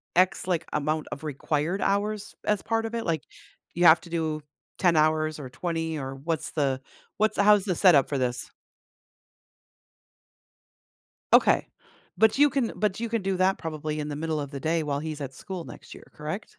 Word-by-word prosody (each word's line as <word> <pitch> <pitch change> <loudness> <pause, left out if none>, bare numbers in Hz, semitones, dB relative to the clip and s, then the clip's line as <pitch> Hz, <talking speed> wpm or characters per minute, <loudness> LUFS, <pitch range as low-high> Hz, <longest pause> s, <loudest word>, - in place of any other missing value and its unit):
X, 185 0 +3
like, 170 -3 0
amount 155 +1 -1
of 140 - -6
required 155 +5 -1
hours 205 +1 -1
as 210 -2 +1
part 225 0 -1
of 230 +1 -4
it? 230 - -3
Like, 160 -4 -1 0.5
you 175 +1 +2
have 160 0 +8
to 175 - -13
do 160 -2 -2 0.4
10 175 -3 +4
hours 155 0 +2
or 130 -3 -7
20, 165 +3 -3
or 135 -1 -5
what's 155 +3 -3
the 135 -3 0 0.4
what's 215 +1 +1
how's 205 -1 +6
the 185 -4 0
setup 160 -7 +5
for 140 - -1
this? 125 -1 -2 2.8
Okay, - - +5 0.5
but 220 +1 +5
you 290 +1 +5
can 265 -4 0
but 210 -1 0
you 235 - -2
can 225 -2 -1
do 190 0 0
that 190 +1 +3
probably 155 -1 -4
in 150 - -4
the 145 - -4
middle 155 0 -2
of 140 -2 -4
the 140 -2 -6
day 165 +1 0
while 145 -2 -2
he's 155 -1 -5
at 135 -1 -5
school 185 -3 -6
next - - -11
year, - - -13
correct? - - -6
165 Hz, 185 wpm, -26 LUFS, 150-195 Hz, 2.8 s, have